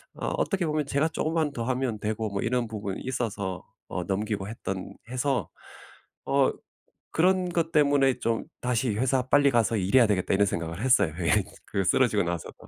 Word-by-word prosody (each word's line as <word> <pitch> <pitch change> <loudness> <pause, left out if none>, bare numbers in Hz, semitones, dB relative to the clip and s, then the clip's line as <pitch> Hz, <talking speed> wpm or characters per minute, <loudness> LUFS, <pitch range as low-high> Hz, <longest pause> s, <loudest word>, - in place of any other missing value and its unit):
어 - - -4
어떻게 195 -4 0
보면 150 -1 0
제가 140 +3 +1
조금만 160 -1 0
더 120 - -3
하면 130 -3 -1
되고 110 +1 -2
뭐 100 -1 -3
이런 120 0 0
부분이 100 -3 -5
있어서 100 -7 -3 0.3
어 - - -3
넘기고 100 0 -2
했던 95 -4 -5 0.2
해서 130 +1 -1 0.8
어 135 -1 +3 0.6
그런 185 +2 +3
것 170 -1 0
때문에 140 -4 +3
좀 115 -1 0 0.2
'다시 125 -2 0
회사 130 +2 +2
빨리 140 +1 +5
가서 115 -1 +2
일해야 110 +5 +4
되겠다.' 95 -2 +1
이런 100 +1 +4
생각을 85 -2 -3
했어요. 120 - +3
예. 80 -3 +2 0.2
그 95 - -1
쓰러지고 110 -1 +3
나서도. 85 -1 -4
120 Hz, 340 characters per minute, -27 LUFS, 100-140 Hz, 0.8 s, 빨리